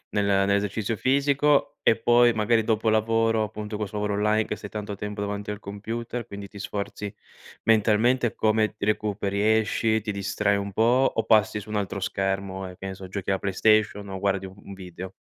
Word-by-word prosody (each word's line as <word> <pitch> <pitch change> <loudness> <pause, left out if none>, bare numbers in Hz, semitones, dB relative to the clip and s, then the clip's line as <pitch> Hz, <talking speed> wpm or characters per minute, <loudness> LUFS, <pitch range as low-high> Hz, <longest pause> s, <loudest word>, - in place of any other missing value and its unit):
nel 105 -1 0
nell'esercizio 100 +2 +1
fisico, 140 +4 +2
e 115 - +4
poi 120 +1 +4
magari 110 0 +2
dopo 110 0 +1
lavoro, 115 0 +2
appunto 105 +1 -6
con 105 - -3
'sto 100 - -8
lavoro 105 -1 -1
online, 105 +1 +2
che 105 - -4
sei 105 - -8
tanto 105 -1 -5
tempo 105 +1 -5
davanti 100 0 -3
al 105 - -8
computer, 115 +4 -5
quindi 100 -1 -8
ti 100 - -12
sforzi 100 +1 -5 0.5
mentalmente 115 +2 +3
come 110 0 +1
ti 105 - -5
recuperi, 105 0 +1
esci, 110 0 +1
ti 105 - -3
distrai 100 +1 0
un 100 0 -4
po', 120 +6 +3
o 115 - +1
passi 110 -1 +3
su 105 - -13
un 105 - -2
altro 100 -1 -2
schermo, 95 0 -2
e 90 - -10
penso, 95 0 -7
giochi 95 0 -4
alla 95 - +1
Playstation 105 +1 +2
o 95 -1 -5
guardi 95 0 0
un 100 +1 -12
video? 95 0 -9
105 Hz, 185 wpm, -25 LUFS, 100-110 Hz, 0.5 s, e